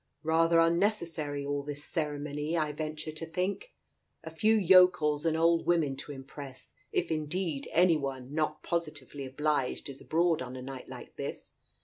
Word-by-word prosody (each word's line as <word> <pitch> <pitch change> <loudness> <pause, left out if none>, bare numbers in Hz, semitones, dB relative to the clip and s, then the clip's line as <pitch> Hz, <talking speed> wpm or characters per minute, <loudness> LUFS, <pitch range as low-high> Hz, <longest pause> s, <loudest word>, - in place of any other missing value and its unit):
Rather 165 +1 +4
unnecessary, 165 -5 +1
all 145 0 -1
this 145 +1 -5
ceremony, 150 0 -2
I 155 -2 +1
venture 155 +1 -5
to 155 +1 -6
think! 185 - -2 0.5
A 160 - -7
few 215 +8 +3
yokels 180 -6 +5
and 160 0 +2
old 165 0 +3
women 160 -6 +2
to 145 - -7
impress, 135 0 -9 0.2
if 170 - 0
indeed, 155 -1 -2
any 170 -1 +5
one 135 -2 -5
not 155 0 -1
positively 150 -4 -3
obliged 145 0 -1
is 135 - -9
abroad 165 -1 +2
on 130 0 -6
a 130 - -6
night 135 -1 -8
like - - -10
this - - -6
155 Hz, 155 wpm, -30 LUFS, 145-170 Hz, 0.5 s, yokels